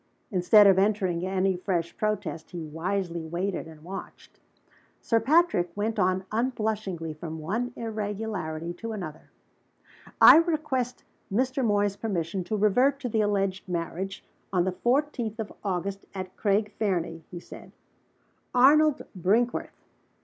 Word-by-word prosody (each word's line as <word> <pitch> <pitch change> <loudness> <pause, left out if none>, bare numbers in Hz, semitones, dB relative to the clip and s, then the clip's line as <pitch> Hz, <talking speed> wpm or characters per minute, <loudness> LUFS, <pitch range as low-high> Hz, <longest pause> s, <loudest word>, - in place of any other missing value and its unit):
Instead 205 +3 +6
of 195 -1 +6
entering 190 -4 +1
any 190 0 +1
fresh 175 -2 -2
protest, 215 -6 -2
he 175 -3 -6
wisely 170 +2 -3
waited 175 +2 -3
and 155 -1 -13
watched. 190 +3 -9 0.6
Sir 230 - +2
Patrick 305 - +3
went 220 +1 -1
on 185 0 +1
unblushingly 215 -8 -2
from 160 +1 -7
one 215 +11 -2
irregularity 205 -7 -4
to 225 +5 -6
another. 160 -7 -7 0.9
"I - - +10
request 300 -7 0 0.3
Mr. 255 +5 0
Moy's 205 -2 +1
permission 185 -4 -2
to 215 +4 -2
revert 250 +7 +3
to 250 - -2
the 220 -1 +1
alleged 195 -2 -1
marriage, 180 +3 -4 0.3
on 180 -3 +2
the 190 - 0
fourteenth 240 0 -1
of 220 - -5
August, 195 0 -3
at 185 -1 -6
Craig 210 0 +1
Fernie," 175 -5 -1
he 175 - -7
said. - - -12 0.8
"Arnold 295 +4 +5
Brinkworth! 215 +7 0
200 Hz, 130 wpm, -27 LUFS, 180-225 Hz, 0.9 s, I